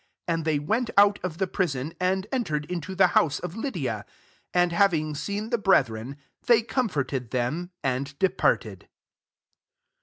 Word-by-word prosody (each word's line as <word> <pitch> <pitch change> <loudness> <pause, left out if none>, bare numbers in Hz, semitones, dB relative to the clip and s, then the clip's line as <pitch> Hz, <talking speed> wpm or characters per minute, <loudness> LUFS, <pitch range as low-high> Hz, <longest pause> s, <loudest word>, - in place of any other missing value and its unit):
40 170 - 0
And 165 -1 -2
they 155 -2 +2
went 220 - -1
out 200 0 +6
of 175 -3 -4
the 190 - +1
prispn, 165 -6 -2
and 190 +1 +1
entered 155 - -1
into 180 +3 -5
the 190 0 +6
house 150 0 +3
of 180 -2 -6
l^ydi^: 170 - -3 0.5
and, 175 0 +3
having 170 -4 +2
seen 200 +9 -4
the 235 - +1
brethren, 130 - +1 0.3
they 235 -2 +5
com 235 +1 0
forted 135 - -2
them, 130 +9 -2
and 135 +1 -2
departed. 190 +2 0
170 Hz, 155 wpm, -26 LUFS, 145-200 Hz, 0.5 s, out